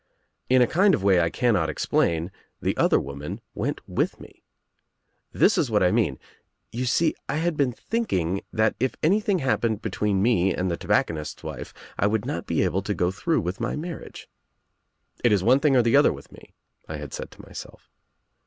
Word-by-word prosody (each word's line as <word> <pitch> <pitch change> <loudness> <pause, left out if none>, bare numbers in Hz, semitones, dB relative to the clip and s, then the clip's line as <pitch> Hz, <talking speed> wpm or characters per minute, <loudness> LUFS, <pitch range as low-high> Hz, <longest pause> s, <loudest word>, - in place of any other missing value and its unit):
In 130 0 +6
a - - +2
kind 190 +1 +5
of 95 - -5
way 95 -3 +4
I 85 - +1
cannot 100 -7 +1
explain 80 +3 0 0.3
the - - -1
other - - +3
woman 70 +2 -6
went - - -4
with - - -1
me. - - -15 0.9
This - - +3
is 135 - +1
what 105 -3 +2
I 90 - +4
mean 105 - +1 0.3
— - - -51
you 125 +2 -3
see 160 +6 +2 0.2
I 135 - 0
had 165 +1 0
been 140 -4 +1
thinking 100 - -2
that 110 0 +1
if 130 +2 0
anything 200 +4 +2
happened 115 - 0
between 105 -1 0
me 95 -6 +2
and 90 0 -1
the 85 - -2
tobacconist's 75 -2 -1
wife - - -7 0.3
I 100 - +3
would 105 0 0
not - - -4
be - - +1
able 95 - 0
to 105 +1 -3
go 90 +1 +1
through 165 - 0
with 90 +2 -4
my 115 - -2
marriage. 165 +1 -7 1.0
'It 120 - +4
is 100 -3 +3
one 125 +5 +5
thing 145 -2 +3
or 125 - +5
the 115 +2 +3
other 145 - +6
with 70 - -10
me,' - - -16 0.3
1 80 - -5
had 75 -2 -8
said - - -6
to - - -14
myself. - - -11
110 Hz, 200 wpm, -25 LUFS, 90-135 Hz, 1.0 s, In